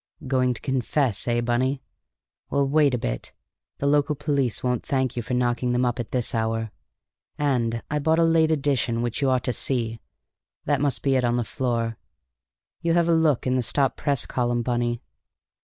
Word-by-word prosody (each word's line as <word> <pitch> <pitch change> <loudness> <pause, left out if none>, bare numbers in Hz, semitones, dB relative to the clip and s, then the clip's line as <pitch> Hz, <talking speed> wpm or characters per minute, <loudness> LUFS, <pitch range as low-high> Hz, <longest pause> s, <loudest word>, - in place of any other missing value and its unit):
"Going 130 -1 +1
to - - -9
confess, 130 -3 0
eh, 120 0 +1
Bunny? 130 +3 0 0.7
Well, 140 0 +1
wait 145 -2 +3
a - - 0
bit; - - -4 0.4
the - - -3
local 145 +1 +2
police 140 -5 -1
won't 125 -1 0
thank 130 -3 -1
you 120 - -1
for 125 +2 -3
knocking 125 0 0
them 125 +1 +2
up 120 0 -1
at 120 - -4
this 125 -3 -1
hour. 115 -1 -1 0.7
And 120 -5 0
I 150 - +1
bought 160 +2 +2
a 165 - +4
late 165 -1 +4
edition 135 -6 0
which 120 +3 -3
you 135 - +2
ought 130 -2 +1
to 125 - -1
see; 115 -4 0 0.7
that - - +1
must 140 -4 0
be 135 -1 +3
it 125 - +1
on 120 0 +1
the 120 - 0
floor. 115 -1 -2 0.8
You 170 0 +1
have 170 0 +3
a - - +5
look 160 -5 +2
in 130 0 +1
the - - +2
stop 135 +3 +1
press 140 -4 0
column, 120 -1 -1
Bunny." 120 -1 -1
125 Hz, 190 wpm, -24 LUFS, 120-140 Hz, 0.8 s, a